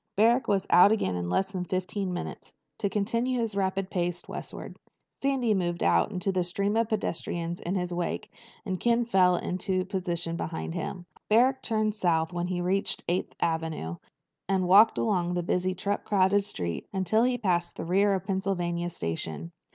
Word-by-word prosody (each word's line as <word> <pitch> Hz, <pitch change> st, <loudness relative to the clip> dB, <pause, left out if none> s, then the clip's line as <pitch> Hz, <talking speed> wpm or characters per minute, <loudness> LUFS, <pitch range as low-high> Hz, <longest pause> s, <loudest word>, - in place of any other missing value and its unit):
Barrack 230 Hz, +5 st, +4 dB
was 195 Hz, -1 st, +1 dB
out 185 Hz, +4 st, +8 dB
again 210 Hz, -, +1 dB
in 90 Hz, -1 st, -3 dB
less 190 Hz, -, 0 dB
than 185 Hz, -2 st, -3 dB
fifteen 185 Hz, +2 st, -2 dB
minutes, 175 Hz, -, -6 dB, 0.3 s
to 200 Hz, -, 0 dB
continue 230 Hz, +5 st, 0 dB
his 225 Hz, -2 st, -1 dB
rapid 190 Hz, -1 st, -1 dB
pace 175 Hz, -1 st, -2 dB
westward. -, -, -7 dB, 0.4 s
Sandy 265 Hz, -5 st, +1 dB
moved 175 Hz, -3 st, -1 dB
out -, -, +3 dB
into 195 Hz, 0 st, -1 dB
the 185 Hz, -1 st, +1 dB
stream 200 Hz, +4 st, -1 dB
of 225 Hz, -1 st, +1 dB
pedestrians 170 Hz, -4 st, -2 dB
in 180 Hz, +3 st, -2 dB
his 180 Hz, -1 st, -2 dB
wake, 175 Hz, 0 st, -3 dB, 0.3 s
and 185 Hz, -3 st, -2 dB
Ken 235 Hz, 0 st, +2 dB
fell 185 Hz, -5 st, +4 dB
into 185 Hz, +1 st, -1 dB
position 175 Hz, -3 st, -2 dB
behind 165 Hz, 0 st, -4 dB
him. 175 Hz, +1 st, -5 dB, 0.2 s
Barrack 255 Hz, +5 st, +4 dB
turned 215 Hz, -3 st, 0 dB
south 170 Hz, -5 st, +1 dB
when 175 Hz, 0 st, -2 dB
he 180 Hz, -1 st, -2 dB
reached 190 Hz, +3 st, 0 dB
Eighth 175 Hz, +2 st, -1 dB
Avenue 160 Hz, -, -2 dB, 0.5 s
and 190 Hz, -2 st, +1 dB
walked 205 Hz, +5 st, +7 dB
along 180 Hz, -5 st, +1 dB
that 175 Hz, -1 st, -1 dB
busy 180 Hz, +1 st, 0 dB
truck 200 Hz, +2 st, -2 dB
crowded 200 Hz, 0 st, +3 dB
street 85 Hz, -, -4 dB
until 195 Hz, +3 st, +1 dB
he 250 Hz, +1 st, +3 dB
had 245 Hz, -1 st, -5 dB
passed 175 Hz, -3 st, +1 dB
the -, -, -5 dB
rear 195 Hz, +3 st, +3 dB
of 190 Hz, -1 st, -4 dB
Pennsylvania 175 Hz, -3 st, -1 dB
Station. 80 Hz, -, -4 dB
185 Hz, 175 wpm, -28 LUFS, 175-205 Hz, 0.5 s, out